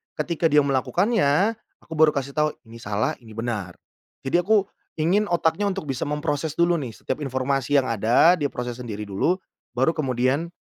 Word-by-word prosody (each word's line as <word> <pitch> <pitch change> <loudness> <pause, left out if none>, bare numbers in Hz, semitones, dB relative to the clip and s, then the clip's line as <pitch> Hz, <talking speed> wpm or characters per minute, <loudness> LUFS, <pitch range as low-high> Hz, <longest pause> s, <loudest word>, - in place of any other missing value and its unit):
ketika 165 +2 -2
dia 150 -1 +5
melakukannya 155 - +2 0.3
aku - - -26
baru 155 -1 +5
kasih 140 0 -2
tahu 150 0 +2 0.2
ini 115 - -11
salah, 105 -1 -1
ini 115 -2 -15
benar. 105 -6 -4 0.5
Jadi 135 - -2
aku, 205 0 +3 0.3
ingin 190 +5 +2
otaknya 170 +3 +1
untuk 190 -6 -4
bisa 130 -3 -2
memproses 150 +1 -2
dulu 170 0 +4
nih 135 -8 -4
setiap 130 +6 -5
informasi 135 +1 -1
yang 130 - -2
ada 115 - +4
diproses 125 -5 -4
sendiri 105 -2 -6
dulu, 160 - 0 0.3
baru 130 +7 +1
kemudian, 135 +3 0
145 Hz, 165 wpm, -24 LUFS, 125-165 Hz, 0.5 s, dia